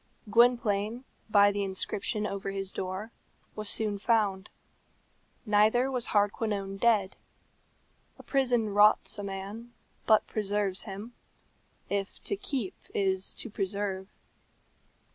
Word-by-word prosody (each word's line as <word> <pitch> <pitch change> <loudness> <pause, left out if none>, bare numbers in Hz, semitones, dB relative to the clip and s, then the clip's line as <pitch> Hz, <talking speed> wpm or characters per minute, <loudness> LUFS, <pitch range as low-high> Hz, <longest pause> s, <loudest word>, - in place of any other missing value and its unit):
Gwynplaine, 230 -1 +3 0.3
by 205 -1 +6
the 205 0 -2
inscription 195 +2 -2
over 195 -1 -3
his 195 -1 -3
door, 190 +4 -5 0.4
was 215 -1 -4
soon 210 -2 -1
found. 205 -3 +1 1.0
Neither 220 +5 +3
was 250 -3 0
Hardquanonne 205 -1 0
dead. 205 -3 +2 1.0
A - - -13
prison 245 -5 +1
rots 210 +1 +4
a - - -4
man, 200 +5 -6 0.3
but 215 -1 +5
preserves 205 -2 -1
him 210 +3 -7 0.7
if 200 0 -3
to 405 - 0
keep 260 - -3 0.2
is 190 -1 +1
to - - -2
preserve. 195 -1 -2
205 Hz, 110 wpm, -29 LUFS, 195-225 Hz, 1.0 s, by